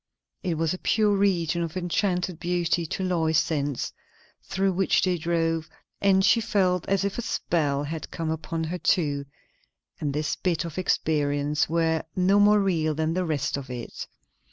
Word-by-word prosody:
It 175 Hz, -4 st, -2 dB
was 160 Hz, +1 st, +1 dB
a 185 Hz, -, -5 dB
pure 210 Hz, -2 st, +2 dB
region 175 Hz, -4 st, +1 dB
of 165 Hz, +1 st, -3 dB
enchanted 180 Hz, -1 st, -1 dB
beauty 175 Hz, -1 st, 0 dB
to 190 Hz, -, -3 dB
Lois's 165 Hz, -3 st, +2 dB
sense, 145 Hz, -4 st, -2 dB, 0.5 s
through 195 Hz, 0 st, 0 dB
which 190 Hz, +1 st, +2 dB
they 185 Hz, -1 st, +2 dB
drove; 165 Hz, -1 st, -1 dB, 0.3 s
and 190 Hz, -1 st, +4 dB
she 230 Hz, -, +4 dB
felt 185 Hz, -5 st, +1 dB
as 195 Hz, 0 st, +2 dB
if 200 Hz, +3 st, -2 dB
a -, -, 0 dB
spell 150 Hz, -10 st, 0 dB
had 155 Hz, +1 st, -5 dB
come 165 Hz, -1 st, -3 dB
upon 160 Hz, +1 st, -3 dB
her 175 Hz, +3 st, -3 dB
too, 145 Hz, -6 st, +1 dB, 0.7 s
and 145 Hz, -, -1 dB
this 150 Hz, +2 st, -1 dB
bit 175 Hz, -2 st, -1 dB
of 170 Hz, +1 st, -5 dB
experience 150 Hz, -4 st, +1 dB
were 165 Hz, -1 st, +1 dB
no 190 Hz, +2 st, +4 dB
more 210 Hz, +1 st, +6 dB
real 165 Hz, -6 st, +1 dB
than 160 Hz, +1 st, 0 dB
the 185 Hz, +1 st, 0 dB
rest 150 Hz, -3 st, -1 dB
of 135 Hz, -2 st, -7 dB
it. 120 Hz, -2 st, -6 dB
170 Hz, 170 wpm, -26 LUFS, 155-185 Hz, 0.7 s, more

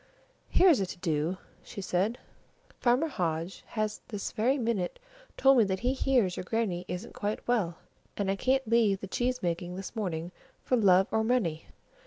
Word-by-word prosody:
"Here's 355 Hz, -, +5 dB
a 190 Hz, -, 0 dB
to 185 Hz, -, -7 dB
do," 165 Hz, 0 st, -1 dB, 0.2 s
she -, -, -9 dB
said. 195 Hz, +5 st, 0 dB, 0.6 s
"Farmer 250 Hz, +6 st, +3 dB
Hodge 175 Hz, -, -3 dB
has 215 Hz, -1 st, -2 dB
this 205 Hz, -5 st, -4 dB
very 245 Hz, +5 st, +1 dB
minute 225 Hz, -8 st, -1 dB, 0.4 s
told 270 Hz, -1 st, +6 dB
me -, -, +7 dB
that 190 Hz, -1 st, -2 dB
he 250 Hz, +2 st, +1 dB
hears 250 Hz, -9 st, +1 dB
your -, -, -3 dB
Grannie 185 Hz, -4 st, -1 dB
isn't 180 Hz, +6 st, -6 dB
quite 210 Hz, +1 st, -3 dB
well, 200 Hz, -9 st, +1 dB, 0.4 s
and 195 Hz, -1 st, 0 dB
I -, -, 0 dB
can't 265 Hz, +4 st, +1 dB
leave 220 Hz, -4 st, +3 dB
the -, -, -6 dB
cheese 250 Hz, +5 st, -1 dB
making 175 Hz, +1 st, -2 dB
this 195 Hz, +4 st, -7 dB
morning 175 Hz, -5 st, -3 dB, 0.3 s
for 255 Hz, -, +2 dB
love 190 Hz, -5 st, +5 dB
or 220 Hz, -, +2 dB
money! 215 Hz, -10 st, 0 dB
205 Hz, 175 wpm, -29 LUFS, 180-240 Hz, 0.6 s, me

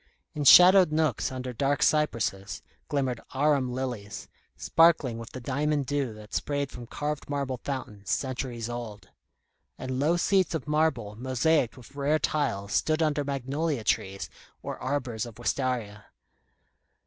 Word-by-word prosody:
In 145 Hz, -1 st, -3 dB
shadowed 180 Hz, +5 st, +8 dB
nooks 155 Hz, -6 st, 0 dB
under 130 Hz, -1 st, -5 dB
dark 140 Hz, +3 st, +1 dB
cypresses, 105 Hz, -10 st, 0 dB, 0.3 s
glimmered 130 Hz, -5 st, -1 dB
arum 140 Hz, -2 st, +2 dB
lilies, 125 Hz, -5 st, -5 dB, 0.3 s
sparkling 160 Hz, -8 st, +3 dB
with 115 Hz, -, -8 dB
the 130 Hz, -, -6 dB
diamond 145 Hz, +3 st, -1 dB
dew 140 Hz, -3 st, -1 dB
that 105 Hz, 0 st, -13 dB
sprayed 140 Hz, -1 st, -2 dB
from 120 Hz, -1 st, -9 dB
carved 150 Hz, +3 st, -4 dB
marble 140 Hz, -3 st, -2 dB
fountains, 110 Hz, -8 st, -6 dB
centuries 125 Hz, -3 st, -2 dB
old; 120 Hz, -3 st, -7 dB, 0.7 s
and 130 Hz, 0 st, -4 dB
low 160 Hz, +5 st, +2 dB
seats 185 Hz, -1 st, +2 dB
of 160 Hz, -, -4 dB
marble 150 Hz, -9 st, 0 dB
mosaiced 130 Hz, +2 st, +1 dB
with 125 Hz, +1 st, -14 dB
rare 145 Hz, +2 st, +1 dB
tiles 105 Hz, -11 st, -1 dB
stood 155 Hz, +1 st, +2 dB
under 150 Hz, -2 st, +1 dB
magnolia 140 Hz, 0 st, -2 dB
trees 100 Hz, -2 st, -1 dB, 0.4 s
or -, -, -5 dB
arbours 130 Hz, -4 st, -2 dB
of 115 Hz, -, -12 dB
wistaria. 120 Hz, -4 st, -2 dB
130 Hz, 135 wpm, -27 LUFS, 120-150 Hz, 0.7 s, shadowed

